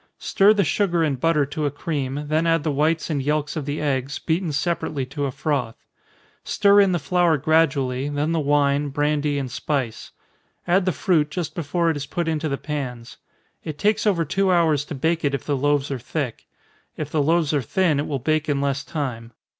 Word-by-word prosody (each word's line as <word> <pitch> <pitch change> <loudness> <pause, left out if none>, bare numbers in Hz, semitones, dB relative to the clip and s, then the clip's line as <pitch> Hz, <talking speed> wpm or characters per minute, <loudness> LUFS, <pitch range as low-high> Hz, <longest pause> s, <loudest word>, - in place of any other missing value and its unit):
Stir 200 +2 +4
the 205 -2 +3
sugar 175 0 +1
and 140 -5 0
butter 150 -1 +2
to 145 +2 -2
a - - +1
cream, 145 -1 -3
then 155 +2 +1
add 165 -2 +2
the 155 - 0
whites 155 +4 0
and 145 -3 0
yelks 150 +2 -1
of 155 -4 -3
the 145 +1 -3
eggs, 140 -1 -1
beaten 165 0 -1
separately 150 -2 -1
to 140 +2 -4
a 135 - -2
froth 135 -4 -2 0.7
stir 200 0 +4
in 195 -2 +3
the 175 - +1
flour 170 +2 +2
gradually, 140 -3 +1
then 145 +2 -1
the 165 - +1
wine, 145 0 +2
brandy, 145 +1 0
and 135 -3 -3
spice. 130 -4 -3 0.6
Add 180 +2 +3
the 185 - +2
fruit 155 -3 +1
just 160 -2 -4
before 170 +1 0
it 155 - -3
is 140 0 -5
put 170 +3 -2
into 155 -1 -1
the 140 - -1
pans. 130 -6 -5 0.5
It 155 -2 -6
takes 215 +3 +1
over 170 -5 +2
two 190 +5 +1
hours 160 -5 +2
to 150 - -6
bake 160 +5 0
it 140 -1 +1
if - - -5
the 145 - 0
loaves 145 +1 +1
are 135 - -3
thick 130 0 -4 0.5
if 150 -1 -5
the 155 - +1
loaves 160 +1 +2
are 145 - +2
thin, 160 - +1
it 145 - -2
will 140 - -1
bake 155 +4 0
in 140 -1 +1
less 140 -1 -1
time. 120 -6 -5
150 Hz, 210 wpm, -23 LUFS, 140-165 Hz, 0.7 s, Stir